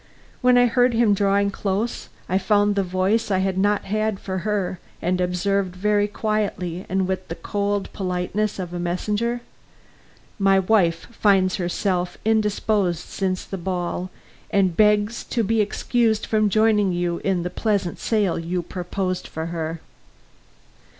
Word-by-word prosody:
When 250 -1 +5
I 245 - +6
heard 245 0 +3
him 225 -3 +4
drawing 200 0 +2
close, 205 +4 -2 0.2
I 185 +2 +1
found 205 0 +3
the 200 - +2
voice 185 +5 0
I 190 - +2
had 190 0 0
not 205 +2 +2
had 215 0 -1
for 190 -1 -4
her, 195 -3 -2 0.2
and 180 +1 0
observed 180 +1 0
very 205 +2 +2
quietly 205 -5 -2
and 190 0 +1
with 190 0 -3
the 165 - -5
cold 205 0 -2
politeness 190 +3 -2
of 180 -2 -5
a 175 - -3
messenger: 210 +7 -1 1.0
"My 195 -1 +4
wife 185 -4 +2
finds 195 -4 +3
herself 180 0 -1
indisposed 210 -5 +1
since 185 -1 -2
the 195 - -6
ball, 180 0 -3 0.4
and 190 -4 +2
begs 210 +2 +3
to 235 - -1
be 220 +1 +2
excused 220 +1 +1
from 215 -1 +2
joining 210 -1 +3
you 175 -1 -1
in 190 -3 0
the 180 - -3
pleasant 200 -5 -1
sail 205 -7 +1
you 175 +2 -2
proposed 185 +1 -4
to 160 0 -2
her." 165 -1 -4
195 Hz, 150 wpm, -23 LUFS, 180-210 Hz, 1.0 s, I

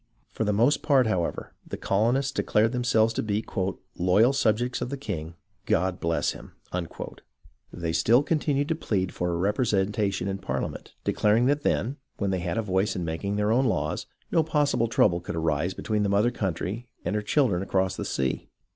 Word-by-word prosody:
For 110 - -2
the 105 - +2
most 120 +8 +3
part, 135 -4 +4
however, 90 -6 -2
the - - -6
colonists 120 +7 +1
declared 110 -5 +2
themselves 120 -3 +2
to - - -1
be 105 0 -1 0.5
"loyal 100 +9 +4
subjects 120 -1 +1
of 125 - -2
the 140 - -4
king 85 - -5
— - - -44
God 90 -1 +1
bless 85 0 0
him!" - - -11 1.2
They 85 -2 -3
still 120 +9 +4
continued 145 -2 0
to - - +3
plead 95 - -1
for 90 - -1
a 85 - -1
representation 100 -1 0
in 95 0 -2
Parliament, - - -4
declaring 110 +3 +3
that 145 +2 +2
then, 135 -1 0 0.2
when 100 -2 -1
they 95 - 0
had 85 -1 -2
a 115 - +1
voice 95 0 0
in 90 - -2
making 85 +5 -2
their 105 +1 +1
own 130 +4 +3
laws, 115 - -1 0.2
no 165 - +4
possible 145 -6 +1
trouble 90 -6 +3
could 90 - -5
arise 80 +2 0
between 105 -1 -1
the 100 - +1
mother 105 +4 +3
country 100 +4 -3 0.2
and 95 - -1
her 105 - +1
children 105 -4 +2
across 95 -1 0
the - - -4
sea. 65 -1 -2
105 Hz, 185 wpm, -26 LUFS, 95-125 Hz, 1.2 s, part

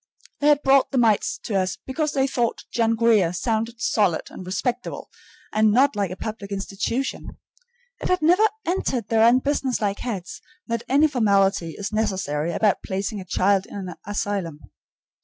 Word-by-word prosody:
They 290 - +1
had 295 -1 +4
brought 270 0 +4
the 270 - -2
mites 225 -4 +2
to 220 - -4
us 185 -1 0
because 300 +3 -2
they 270 -1 +2
thought 240 -4 -1
"John 230 -1 +1
Grier" 220 -7 +3
sounded 225 +5 -2
solid 200 -9 +1
and - - -9
respectable, 240 +7 -3 0.4
and 215 0 +4
not 265 +5 +3
like 200 -3 -1
a 185 - -6
public 205 0 -6
institution. 200 +6 -3 0.6
It - - -2
had 365 -3 +1
never 355 +6 +4 0.2
entered 260 - -1
their 225 -1 +3
unbusinesslike 245 -3 +2
heads 200 -8 -5 0.2
that 230 -1 -2
any 285 +4 +5
formality 200 - +1
is 200 +1 -5
necessary 190 -8 -1
about 210 +2 +1
placing 195 +2 -3
a - - -10
child 190 +2 +1
in - - -11
an 185 -3 -5
asylum. 200 -6 -4
220 Hz, 160 wpm, -23 LUFS, 195-250 Hz, 0.6 s, any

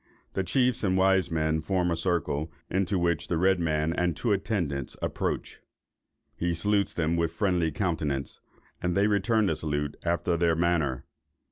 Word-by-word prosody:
The 95 - 0
chiefs 125 +6 +1
and 95 -2 +2
wise 95 -2 +3
men 80 -1 0
form 90 +1 0
a - - +1
circle, 80 -3 -1 0.2
into 95 +1 +1
which 85 -2 0
the 85 - 0
red 95 +2 +3
man 80 -1 0
and 85 -2 0
two 120 - 0
attendants 90 - -1
approach. - - -3 0.8
He 85 0 -1
salutes 100 +3 +1
them 85 0 0
with 85 -1 +1
friendly 90 -5 +1
countenance, 75 -6 -2 0.4
and 90 +1 0
they 100 - +4
return 105 +2 +2
the 85 -5 +1
salute 75 -2 -2
after 85 0 0
their 85 -1 +2
manner. 80 -6 0
85 Hz, 160 wpm, -28 LUFS, 80-95 Hz, 0.8 s, they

